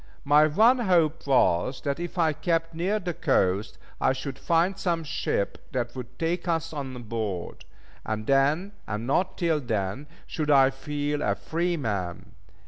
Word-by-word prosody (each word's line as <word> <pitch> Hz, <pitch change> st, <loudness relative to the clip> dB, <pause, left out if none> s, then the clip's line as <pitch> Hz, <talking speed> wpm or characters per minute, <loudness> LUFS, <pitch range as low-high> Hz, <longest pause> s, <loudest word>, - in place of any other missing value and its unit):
My 150 Hz, +2 st, +5 dB
one 225 Hz, -, +4 dB
hope 165 Hz, -8 st, +2 dB
was 125 Hz, -2 st, +2 dB
that 140 Hz, +1 st, -2 dB
if 175 Hz, +2 st, -5 dB
I 160 Hz, -3 st, +3 dB
kept 165 Hz, +1 st, -1 dB
near 180 Hz, +6 st, 0 dB
the 180 Hz, -4 st, -3 dB
coast, 105 Hz, -, +1 dB, 0.2 s
I -, -, +3 dB
should 135 Hz, +1 st, -6 dB
find 165 Hz, +6 st, +2 dB
some 170 Hz, -4 st, -1 dB
ship 100 Hz, -8 st, -2 dB
that 120 Hz, -1 st, -2 dB
would 125 Hz, 0 st, -8 dB
take 170 Hz, +2 st, -1 dB
us 165 Hz, -1 st, -1 dB
on 130 Hz, -4 st, -5 dB
board; 105 Hz, -6 st, -4 dB, 0.4 s
and 110 Hz, 0 st, -3 dB
then, 145 Hz, -, +2 dB, 0.2 s
and 105 Hz, +1 st, -3 dB
not 180 Hz, +8 st, 0 dB
till 165 Hz, -4 st, +1 dB
then, 115 Hz, +1 st, -3 dB, 0.2 s
should 155 Hz, -2 st, -3 dB
I 135 Hz, -2 st, +6 dB
feel 145 Hz, +2 st, -3 dB
a -, -, +1 dB
free 170 Hz, +1 st, -1 dB
man. 100 Hz, -, -3 dB
145 Hz, 160 wpm, -26 LUFS, 125-165 Hz, 0.4 s, I